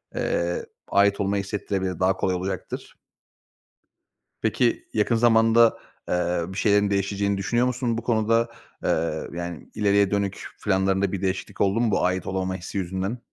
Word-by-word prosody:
eee, 85 0 -1 0.2
ait 100 0 +3
olmayı 100 0 0
hissettirebilir. 95 -2 -3
Daha 95 0 +2
kolay 95 -1 0
olacaktır. 95 0 -5 1.5
Peki, 120 -2 +1
yakın 110 +2 +2
zamanda, 115 0 +5 0.3
eee, 90 0 +1
bir 95 +1 -7
şeylerin 105 -1 +3
değişeceğini 100 0 0
düşünüyor 120 +6 +1
musun 125 -2 -1
bu 115 - -2
konuda? 115 0 +2 0.3
Eee, 85 - 0
yani, 85 -1 -6
ileriye 100 -2 +3
dönük 100 -1 -1 0.2
planlarında 95 0 +2
bir 100 -1 -3
değişiklik 95 -1 -3
oldu 100 +3 +2
mu 120 -2 +2
bu 95 - +2
ait 90 0 -1
olamama 95 -1 -2
hissi 95 +2 -6
yüzünden? 95 +5 -2
100 Hz, 145 wpm, -25 LUFS, 95-110 Hz, 1.5 s, zamanda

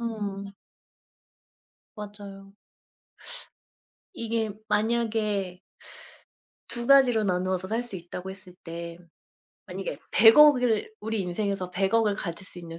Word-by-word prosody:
음. 200 -4 -4 1.4
맞아요. 200 -1 -10 1.6
이게 230 -5 -1 0.2
만약에 210 -4 0 1.1
2 240 -1 -3
가지로 250 -5 +6
나누어서 185 0 0
살 225 +3 -1
수 240 -6 -7
있다고 180 +2 -7
했을 185 -1 -12
때 170 0 -7 0.7
만약에 - - -5
10,000,000,000 290 +5 +8
을 220 -3 +1
우리 220 0 -2
인생에서 190 0 -2
10,000,000,000 195 +5 +2
을 205 - +2
가질 190 -1 -6
수 180 - -12
있는 165 -1 -9
205 Hz, 190 characters per minute, -27 LUFS, 185-225 Hz, 1.6 s, 10,000,000,000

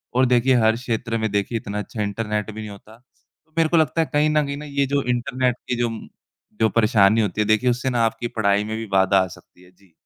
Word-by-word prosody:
और 130 +1 +4
देखिए 125 +1 +3
हर 110 0 +3
क्षेत्र 115 -1 -3
में 110 -1 -1
देखिए 100 +3 -1
इतना 105 -1 -5
अच्छा 105 +1 -5
इंटरनेट 105 +1 -3
भी 110 - -9
नहीं 105 - -7
होता, 105 +2 -13 0.5
तो 160 - -37
मेरे 165 -1 +3
को 170 - +3
लगता 160 +1 +2
है 160 - -1
कहीं 150 +1 +3
न 150 -1 +2
कहीं 140 0 -4
ना 150 - -8
ये 140 -1 0
जो 140 0 0
इंटरनेट 125 0 -1
की 125 - +1
जो 120 -1 +1 0.7
जो 110 - +4
परेशानी 110 -1 +3
होती 105 -1 -1
है, 105 - 0
देखिए 110 +4 +3
उससे 125 +2 -1
ना 120 -2 +1
आपकी 115 +1 -2
पढ़ाई 100 -3 +1
में 110 +1 -4
भी 115 - -5
बाधा 95 0 +3
आ - - -4
सकती 90 +1 -16
है। 90 - -20
जी। 90 -1 -27
115 Hz, 250 wpm, -22 LUFS, 105-130 Hz, 0.7 s, और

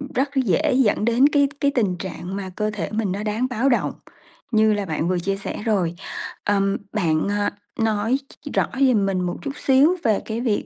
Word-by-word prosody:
rất 270 +2 +1
dễ 265 - +2
dẫn 215 -4 +2
đến 240 +4 +5
cái 285 -1 +3
cái 280 0 +2
tình 200 -8 +1
trạng 185 0 -6
mà 195 -2 -4
cơ 215 0 0
thể 170 -7 -3
mình 215 -3 -1
nó 205 +2 -3
đáng 220 +4 0
báo 250 +3 +1
động 240 - +1 0.6
như 220 -1 +4
là 205 -1 -1
bạn 160 -1 -2
vừa 185 -1 +1
chia 195 +3 -1
sẻ 200 - -5
rồi. 180 -6 +1 0.5
Ờm, 195 -1 +1 0.2
bạn, 165 -5 +1
à, 205 0 0 0.3
nói 225 +3 +1 0.3
ch - - -5
rõ - - +2
giùm 245 -7 +4
mình 195 -1 0
một 175 -1 -2
chút 280 - -4
xíu 285 +7 +4
về 215 -3 +3
cái 225 +1 -3
việc, 225 -5 0
215 Hz, 210 wpm, -22 LUFS, 195-250 Hz, 0.6 s, đến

